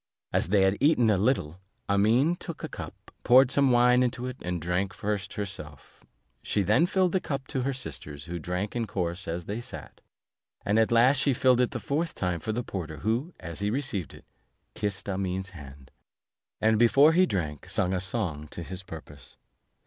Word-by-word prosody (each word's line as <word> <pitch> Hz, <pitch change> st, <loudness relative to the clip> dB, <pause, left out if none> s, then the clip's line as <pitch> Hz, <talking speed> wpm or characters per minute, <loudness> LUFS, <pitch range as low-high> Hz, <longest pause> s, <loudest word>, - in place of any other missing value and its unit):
After -, -, +1 dB
they 100 Hz, -1 st, +4 dB
had 95 Hz, +1 st, +2 dB
eaten 130 Hz, -6 st, +4 dB
a -, -, +4 dB
little, 95 Hz, -, 0 dB, 0.3 s
Amene 115 Hz, +11 st, +3 dB
took 170 Hz, -, -7 dB
a -, -, -2 dB
cup, -, -, -10 dB
poured 130 Hz, +1 st, +6 dB
some 140 Hz, -1 st, +4 dB
wine 125 Hz, 0 st, +5 dB
into 125 Hz, 0 st, -1 dB
it, 125 Hz, 0 st, -5 dB
and 90 Hz, 0 st, -3 dB
drank 90 Hz, +4 st, -1 dB
first 100 Hz, -2 st, -3 dB
herself; 95 Hz, -9 st, -7 dB, 0.4 s
she 105 Hz, -, 0 dB
then 110 Hz, -, +3 dB
filled 185 Hz, -1 st, +2 dB
the 190 Hz, -, +2 dB
cup 140 Hz, -6 st, -4 dB
to 130 Hz, -, -1 dB
her 135 Hz, +2 st, 0 dB
sisters, 75 Hz, -, -5 dB
who 85 Hz, 0 st, -5 dB
drank 90 Hz, +6 st, -3 dB
in 115 Hz, -2 st, -1 dB
course 90 Hz, -2 st, -3 dB
as 85 Hz, +1 st, -4 dB
they 105 Hz, +4 st, -4 dB
sat; 125 Hz, 0 st, -10 dB, 0.6 s
and 105 Hz, +2 st, +3 dB
at 110 Hz, -, +2 dB
last 125 Hz, +4 st, +5 dB
she 140 Hz, 0 st, +2 dB
filled 125 Hz, 0 st, +4 dB
it 125 Hz, -, +2 dB
the 125 Hz, -, -5 dB
fourth 145 Hz, -, -2 dB
time 90 Hz, -2 st, -1 dB
for 110 Hz, -, -3 dB
the 120 Hz, +3 st, -2 dB
porter, 80 Hz, -8 st, -5 dB
who, 125 Hz, +10 st, -1 dB
as 85 Hz, -1 st, -7 dB
he 100 Hz, +1 st, 0 dB
received 110 Hz, -, -2 dB
it, -, -, -16 dB, 0.5 s
kissed 100 Hz, -1 st, -3 dB
Amene's 95 Hz, -1 st, -2 dB
hand; 70 Hz, -5 st, -12 dB, 0.7 s
and 110 Hz, 0 st, +3 dB
before 140 Hz, +7 st, +6 dB
he 185 Hz, +2 st, +4 dB
drank, 75 Hz, -, -3 dB
sung 90 Hz, -, 0 dB
a 90 Hz, -, 0 dB
song 90 Hz, -6 st, -3 dB
to 85 Hz, -, -7 dB
this 95 Hz, +2 st, -7 dB
purpose. 75 Hz, -7 st, -12 dB
105 Hz, 195 wpm, -27 LUFS, 90-125 Hz, 0.7 s, poured